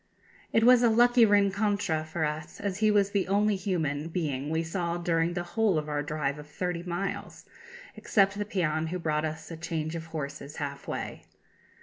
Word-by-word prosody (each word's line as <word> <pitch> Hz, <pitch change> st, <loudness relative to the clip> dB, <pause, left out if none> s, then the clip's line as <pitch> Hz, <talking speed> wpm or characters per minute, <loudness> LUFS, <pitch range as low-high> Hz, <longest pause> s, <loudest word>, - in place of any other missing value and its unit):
It 225 Hz, -, +3 dB
was 250 Hz, 0 st, +7 dB
a 240 Hz, -, +5 dB
lucky 240 Hz, +1 st, +5 dB
rencontre 200 Hz, -4 st, +2 dB
for 160 Hz, 0 st, -2 dB
us, 150 Hz, +1 st, -5 dB
as 200 Hz, -1 st, -3 dB
he 215 Hz, 0 st, +4 dB
was 200 Hz, -1 st, +3 dB
the 200 Hz, -2 st, 0 dB
only 205 Hz, +2 st, +2 dB
human 160 Hz, -6 st, -1 dB
being 150 Hz, -5 st, -2 dB
we 160 Hz, +1 st, 0 dB
saw 170 Hz, 0 st, -2 dB
during 170 Hz, 0 st, +1 dB
the 175 Hz, -, -1 dB
whole 190 Hz, +1 st, +1 dB
of 150 Hz, 0 st, -2 dB
our 150 Hz, -1 st, -1 dB
drive 150 Hz, -1 st, -2 dB
of 150 Hz, -, -10 dB
thirty 175 Hz, +2 st, -3 dB
miles, 180 Hz, +2 st, -4 dB, 0.5 s
except 195 Hz, -2 st, +2 dB
the -, -, +1 dB
peon 160 Hz, -5 st, 0 dB
who 180 Hz, +3 st, -3 dB
brought 155 Hz, -2 st, 0 dB
us 155 Hz, +1 st, -6 dB
a 165 Hz, -, -6 dB
change 160 Hz, -1 st, -3 dB
of 165 Hz, 0 st, -6 dB
horses 140 Hz, -2 st, -6 dB
half 140 Hz, -1 st, -5 dB
way. -, -, -5 dB
170 Hz, 190 wpm, -28 LUFS, 155-200 Hz, 0.5 s, was